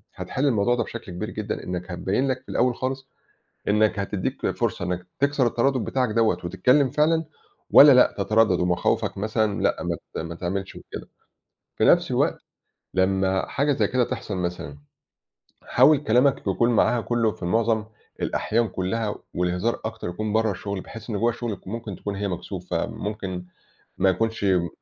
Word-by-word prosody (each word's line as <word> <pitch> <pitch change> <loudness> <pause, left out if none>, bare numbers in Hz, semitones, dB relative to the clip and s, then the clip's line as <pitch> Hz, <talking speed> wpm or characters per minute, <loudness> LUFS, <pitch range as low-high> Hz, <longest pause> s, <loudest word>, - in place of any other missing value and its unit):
هتحِل 135 +3 -2
الموضوع 120 -2 +2
ده 120 - 0
بشكل 110 -5 -8
كبير 105 +5 -4
جدًا 105 -1 -4
إنك 90 0 -5
هتبَيّن 95 +9 0
لَك 130 -1 -1
في 130 - -20
الأول 125 0 +1
خالص 130 +2 -4 0.6
إنك 105 0 +3
هتدِّيك 100 -1 -2
فرصة - - -2
إنك 90 0 -3
تكسر 140 -2 +2
التَردُّد 120 +1 +1
بتاعَك 130 -2 0
دوّة، 110 -4 +2
وتتكلم 125 +10 +3
فعلًا 160 +3 +2 0.5
والّا 145 0 +9
لأ 125 -1 +5
تِترَدَّد 105 -2 +3
ومخاوفَك 90 +2 0
مثلًا 110 0 0
لأ - - +1
مات 80 - -5
ما 85 0 -6
تعملش 95 +3 -4
وكده. - - -9 0.7
في - - +2
نفس - - +4
الوقت - - +1 0.6
لمّا 95 0 +1
حاجة 145 +1 +1
زي - - +1
كده 125 -1 +1
تحصل 115 -5 -4
مثلًا 85 -5 -4 0.9
حاول 150 -2 +5
كلامَك 130 0 +3
يكون 115 +5 +2
معاها 120 +1 +3
كُلُّه 115 -2 +1
في - - -16
المُعظَم 110 +4 +1 0.4
الأحيان 115 0 0
كُلّها 105 +4 -2 0.2
والهِزار 90 +6 0
أكتر 110 -4 -4
يكون 105 +4 -3
برّه 110 0 +2
الشغل، 100 +1 -5
بحيث 115 +3 -10
إن 105 - -1
جوّه 120 +2 +2
شُغلَك 110 -6 -6
ممكن 110 -3 -5
تكون 100 -1 -5
هي 100 +1 -2
مكسوفة 90 -1 -3
ممكن 95 -4 -5 0.5
ما 95 +1 +3
يكونش 115 +3 -1
م 90 -3 +2
110 Hz, 160 wpm, -24 LUFS, 95-120 Hz, 0.9 s, والّا